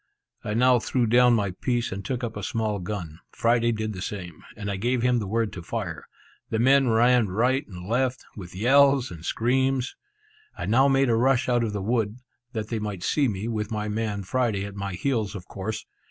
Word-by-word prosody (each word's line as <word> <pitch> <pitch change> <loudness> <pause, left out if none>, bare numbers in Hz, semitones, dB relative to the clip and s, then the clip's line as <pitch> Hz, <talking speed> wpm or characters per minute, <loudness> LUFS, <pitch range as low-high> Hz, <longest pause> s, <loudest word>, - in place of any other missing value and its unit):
I 105 - -3
now 125 +1 +5
threw 120 +2 0
down 120 +1 +5
my 100 -3 0
piece, 120 +5 -1
and 100 +1 -5
took 125 +2 -3
up 115 -1 -3
a 105 - -5
small 110 0 -1
gun; 90 -4 -5
Friday 120 0 +2
did 110 -1 -3
the 90 - -7
same; 90 -5 -6
and 100 -1 -4
I - - -2
gave 120 +5 0
him 125 -1 +3
the 105 - -4
word 110 0 -1
to 90 - -6
fire! 90 -3 -5 0.4
The 110 - -1
men 135 +3 +4
ran 120 0 +4
right 125 +9 +1
and 90 -2 -9
left, 125 +3 0
with 90 -3 -9
yells 135 +4 +4
and 85 -2 -9
screams. 130 +5 0 0.6
I - - -4
now 130 +6 +4
made 135 -2 +3
a - - +3
rush 125 +1 +2
out 120 -1 +2
of 110 - -1
the 100 -2 -3
wood, 110 0 0 0.4
that 110 -1 -4
they 115 - -2
might 105 -4 -5
see 140 +6 +2
me, 105 -1 -3
with 110 -2 -2
my 105 -1 -3
man 105 -2 -2
Friday 110 -2 0
at 100 - -7
my 100 -1 -4
heels, 110 0 -1
of 95 -3 -8
course. 105 +3 -5
110 Hz, 210 wpm, -25 LUFS, 100-125 Hz, 0.6 s, now